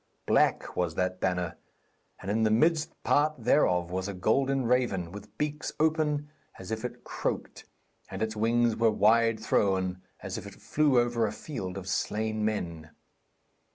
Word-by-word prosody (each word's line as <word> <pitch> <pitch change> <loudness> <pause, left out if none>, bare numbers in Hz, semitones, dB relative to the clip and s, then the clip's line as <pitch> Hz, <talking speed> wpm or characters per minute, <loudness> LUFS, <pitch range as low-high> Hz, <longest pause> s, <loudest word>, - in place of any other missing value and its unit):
Black - - +2
was 85 -3 -1
that 90 0 -1
banner, 90 -3 -1 0.6
and 95 - -4
in 110 +2 +1
the 110 - +3
midmost 155 +8 +3
part 150 +1 +3
thereof 90 - +2
was 95 +1 -2
a 100 - -5
golden 135 +7 +1
raven, 115 -8 +1
with 100 +2 -11
beaks 150 0 -2
open 155 -2 +1 0.3
as 95 +2 -9
if 110 0 -3
it 125 0 -6
croaked, - - -4 0.4
and 95 +3 -3
its 110 0 -2
wings 115 +1 +2
were 115 0 +3
wide 110 +1 +3
thrown, 95 -4 +1 0.2
as - - -4
if - - -10
it - - -11
flew 145 -4 +2
over 120 -2 +1
a - - -3
field 100 - -6
of 95 -1 -7
slain 110 +2 -1
men. 85 -7 -3
110 Hz, 160 wpm, -29 LUFS, 95-125 Hz, 0.6 s, the